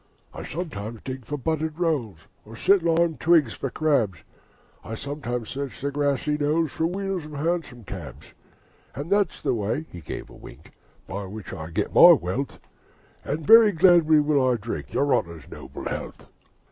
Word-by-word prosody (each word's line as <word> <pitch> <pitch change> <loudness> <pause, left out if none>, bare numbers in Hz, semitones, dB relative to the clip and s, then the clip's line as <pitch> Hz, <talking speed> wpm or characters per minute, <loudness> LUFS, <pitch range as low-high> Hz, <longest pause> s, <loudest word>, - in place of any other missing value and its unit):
'I - - -7
sometimes 120 - -5
dig 130 -2 -6
for 145 - -3
buttered 155 +2 -2
rolls, 150 - -1 0.3
Or 110 +2 -12
set 195 - +4
limed 165 -1 +1
twigs 160 -7 +4
for 135 - -4
crabs: 125 - +1 0.7
I 115 - -6
sometimes 125 -4 -5
search 140 -1 -5
the 140 +1 -2
grassy 145 +1 0
knolls 150 +1 +1
For 160 - 0
wheels 195 -1 -3
of 150 - -10
Hansom 150 -5 -2
cabs. - - -9 0.7
And 145 +6 -6
that's 200 -4 +1
the - - +1
way' 115 +8 -2
(he 85 - -9
gave - - -7
a - - -13
wink) - - -14 0.4
'By 100 +1 -5
which 100 +1 -8
I 80 -3 -7
get 85 - -2
my - - +10
wealth 120 +11 -2 0.7
And 150 +2 -3
very 225 +3 +8
gladly 165 -3 +5
will 145 -2 +2
I 125 - +2
drink 115 0 -6
Your 140 0 +1
Honour's 85 -4 -2
noble - - -9
health.' - - -6
145 Hz, 170 wpm, -25 LUFS, 115-160 Hz, 0.7 s, my